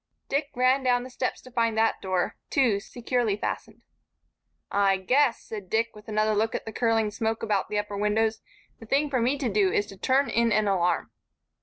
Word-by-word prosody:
Dick 280 +1 0
ran 255 +2 +3
down 245 -1 +2
the 255 - -10
steps 250 0 -3
to 255 - -14
find 230 -2 0
that 225 0 +2
door, 185 -2 -1
too, 235 -7 +2
securely 235 -1 -1
fastened. - - -5 0.9
"I 195 -1 +3
guess," 250 +6 +2
said 205 -4 -8
Dick, 225 +2 0
with 210 0 -14
another 215 0 +1
look 220 +2 0
at - - -4
the 220 - -7
curling 225 -3 +1
smoke 225 +1 -2
about 205 -3 0
the 210 - -2
upper 205 0 -2
windows, 220 +2 +1 0.4
"the 225 - -12
thing 280 +4 +1
for 255 -3 +1
me 255 +5 +1
to 275 -3 -2
do 200 -3 +2
is 205 - +1
to 195 -2 -12
turn 270 +6 +2
in 235 0 +1
an 215 0 +2
alarm." 180 -3 +1
225 Hz, 200 wpm, -26 LUFS, 210-250 Hz, 0.9 s, ran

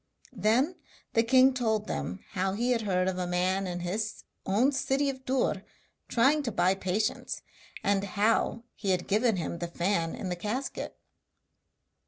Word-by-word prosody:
Then 255 +11 +2 0.4
the 230 - +5
king 260 +3 +5
told 220 -4 0
them 200 - -4
how 190 -1 0
he 240 +5 0
had 235 -2 +2
heard 185 -3 +1
of 185 -1 -1
a 180 - -1
man 185 +2 +1
in 175 -1 -4
his 210 +5 -3 0.2
own 225 +9 +3
city 275 0 +1
of 260 -1 -13
Dûr 255 -7 0 0.4
trying 270 +6 +3
to 250 -5 -2
buy 185 -2 +3
patience, 195 +2 -2 0.4
and 200 0 +2
how 215 +3 +1
he 200 - -4
had 180 -1 +1
given 220 +2 +3
him 170 -1 -3
the 175 - -2
fan 170 -1 0
in 185 - -4
the 180 - -1
casket. 215 +9 -4
210 Hz, 165 wpm, -29 LUFS, 185-245 Hz, 0.4 s, the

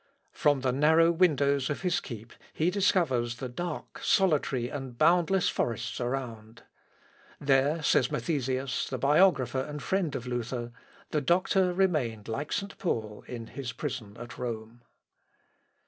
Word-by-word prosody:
From 145 -2 +2
the 130 -1 +1
narrow 160 +5 +4
windows 145 -6 +2
of 150 - -3
his 180 -2 +1
keep 115 -2 -9 0.2
he 165 +3 +1
discovers 150 -12 +1
the 130 +2 -5
dark, 170 +6 -6
solitary, 145 -9 +2
and 130 -2 -6
boundless 180 +4 +3
forests 115 +1 -2
around. 115 -3 -5 0.8
"There," 145 +3 +2
says 125 -3 +3
Mathesins, 135 -4 -1
the - - -3
biographer 140 -4 +3
and 150 +2 -6
friend 170 -2 -1
of 125 - -4
Luther, 120 -1 -3 0.4
"the 150 - +1
doctor 180 +4 +2
remained 150 - 0
like 140 +7 -4
St. 200 0 -3
Paul 110 - -3
in 120 -2 -6
his 125 -1 -6
prison 115 -3 -5
at 120 0 -9
Rome." 115 -1 -5
135 Hz, 135 wpm, -29 LUFS, 120-165 Hz, 0.8 s, narrow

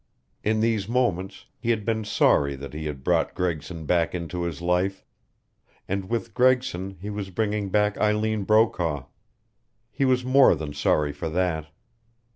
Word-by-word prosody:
In 110 +1 +1
these 110 -3 0
moments 100 -6 -1
he 115 0 -3
had 110 -3 +1
been 110 -1 0
sorry 70 -8 +3
that 70 -1 -9
he 75 0 -4
had 70 -3 -6
brought - - +1
Gregson 85 -2 -3
back 85 +2 +1
into 85 0 -4
his 85 -2 -3
life. 90 +3 0 0.8
And 95 0 -3
with 115 -4 -2
Gregson 125 -7 +1
he 105 +3 -5
was 100 -2 -5
bringing 105 0 -1
back 105 +1 +1
Eileen 105 0 +1
Brokaw. 90 - +2 0.9
He 135 - 0
was 125 -1 +2
more 130 -6 +6
than 75 -1 -6
sorry 75 0 +1
for 75 +3 -4
that. 80 -2 -1
95 Hz, 155 wpm, -25 LUFS, 85-110 Hz, 0.9 s, more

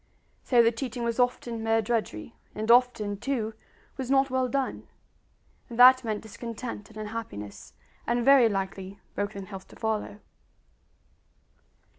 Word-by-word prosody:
So 240 -2 +4
the 230 - +4
teaching 245 0 -5
was 235 +1 -1
often 245 -2 0
mere 225 0 +2
drudgery, 215 - -2 0.2
and 220 +2 +1
often, 235 -5 +3
too, 225 -1 -2 0.4
was 260 -2 -4
not 270 0 +3
well 260 0 +1
done; 270 +2 -2 0.8
and 235 - -8
that 255 +1 +8
meant 220 -2 -3
discontent 230 0 -7
and 220 - -14
unhappiness, 215 - -7 0.3
and 235 0 +1
very 270 -4 +7
likely 195 0 -4
broken 205 -1 -4
health 195 -1 -9
to - - -16
follow. 215 -1 -3
230 Hz, 135 wpm, -27 LUFS, 210-250 Hz, 0.8 s, that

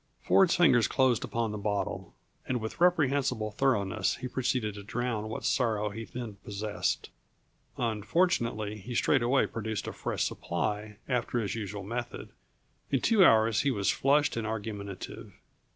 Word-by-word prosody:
Ford's 190 -3 +4
fingers 130 -10 +5
closed 130 -4 +2
upon 115 -2 -2
the 105 - -4
bottle, 100 0 -3 0.3
and 125 -1 0
with 110 +8 -6
reprehensible 140 -10 +2
thoroughness 105 -5 +1
he 125 - -5
proceeded 125 -4 -1
to 100 - -8
drown 110 0 -3
what 110 - -5
sorrows 105 -4 +1
he 115 +2 -6
then 115 -4 -7
possessed. 105 +1 -2 0.7
Unfortunately 115 - 0
he 120 +5 -7
straightway 130 +1 +3
produced 110 -2 -4
a - - -5
fresh - - -2
supply, 105 +4 -3
after 125 -1 -1
his 110 -4 -1
usual 105 -2 -5
method. 120 +4 -5 0.6
In 135 - +2
two 215 -4 +5
hours 110 - +5
he 140 - +1
was 100 -7 +1
flushed 145 +2 +2
and 115 -1 -2
argumentative. 105 -3 -6
115 Hz, 145 wpm, -29 LUFS, 105-130 Hz, 0.7 s, fingers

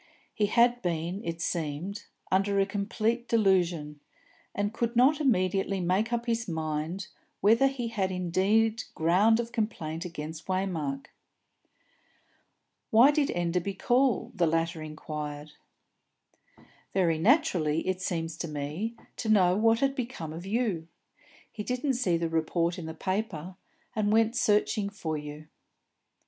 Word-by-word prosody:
He 210 - +1
had 240 +3 +3
been, 175 +3 -2
it 165 -3 -4
seemed, 170 +4 -3 0.3
under 195 +1 +2
a 195 - +4
complete 215 +4 -1
delusion, 175 -9 +1 0.6
and 205 +1 -1
could 235 +1 -2
not 275 +6 +4
immediately 195 -6 +1
make 185 +6 +1
up 235 0 -1
his 230 -1 -1
mind 160 +2 -3 0.3
whether 230 +6 +5
he 255 -4 -3
had 195 -4 -1
indeed 200 +6 +1
ground 195 +8 +4
of 235 0 -3
complaint 175 -9 -3
against 160 -2 -7
Waymark. 170 -8 -2 1.8
"Why 240 +6 +7
did 295 -1 +2
Mr. - - -4
Enderby 175 +2 -1
call?" 250 +5 +2
the 175 -6 +2
latter 165 +1 0
inquired. 150 -1 -6 1.4
"Very 170 -4 +2
naturally, 180 - +2
it 185 0 -1
seems 165 -3 -3
to 170 - -4
me, 155 +10 -4 0.2
to 225 - -3
know 185 -4 +5
what 225 +3 +3
had 275 0 +2
become 235 - -5
of 170 +3 -8
you. 205 -7 -1 0.6
He 215 - -6
didn't 250 +5 -1
see 230 -9 +1
the 165 0 -1
report 165 +2 0
in 160 - -6
the 160 - -6
paper, 185 -2 -3 0.4
and 210 -1 +1
went 225 +2 +3
searching 210 -2 +2
for 165 -6 -4
you." 150 +1 -7
190 Hz, 135 wpm, -28 LUFS, 165-225 Hz, 1.8 s, Why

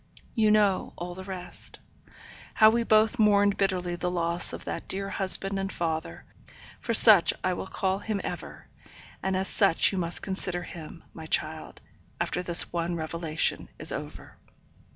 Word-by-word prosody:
You 220 -3 +2
know 205 -3 +1
all 175 +1 -6
the 190 +1 -9
rest. 185 -2 -8 0.8
How 215 -1 +6
we 235 +1 0
both 220 +1 +2
mourned 205 -2 +3
bitterly 180 -3 -1
the 180 +1 -3
loss 170 -1 0
of - - -8
that - - -6
dear 195 +1 -3
husband 195 0 +4
and 195 0 -4
father 160 -1 -4 0.5
for - - -4
such 210 -7 +7
I 185 - 0
will 180 - -6
call 190 0 -2
him 210 -1 -3
ever - - -7 0.6
and 190 -1 -1
as 190 +1 -1
such 195 -6 +3
you 190 - -3
must 170 -1 -2
consider 185 -2 -2
him, 165 -1 -11
my 160 -1 -10
child, 155 0 -1 0.4
after 180 - -2
this 175 -1 +3
one 170 0 -2
revelation 160 -1 -2
is - - -1
over. - - -8
185 Hz, 160 wpm, -26 LUFS, 170-200 Hz, 0.8 s, such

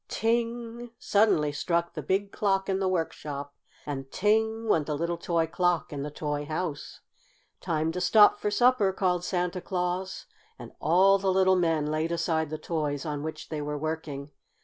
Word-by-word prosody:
Ting! 235 +1 -2
suddenly 200 -8 +2
struck 170 +3 -1
the - - -4
big 200 +1 -1
clock 195 -2 0
in 190 -1 0
the 190 - 0
workshop. 150 -5 -3 0.3
And 135 -2 -5
ting! 220 +3 +1
went 160 -8 +2
the 150 -2 -1
little 170 +2 -1
toy 170 -1 +1
clock 175 -1 0
in 140 - -4
the 145 - -3
toy 150 0 -3
house. 155 -1 -4 0.6
"Time 160 0 -1
to 180 +2 -4
stop 205 +4 +6
for 210 - 0
supper!" 210 -1 +3
called 180 -2 0
Santa 180 0 -1
Claus, 180 0 -3 0.3
and - - -10
all 190 +5 +4
the 190 0 +1
little 190 0 +4
men 165 -4 +1
laid 155 +2 -1
aside 160 -2 0
the 155 - -4
toys 150 -3 -2
on 150 -2 -3
which 155 0 -6
they 155 -2 -3
were 150 0 -3
working. 150 -2 -4
170 Hz, 170 wpm, -28 LUFS, 155-195 Hz, 0.6 s, stop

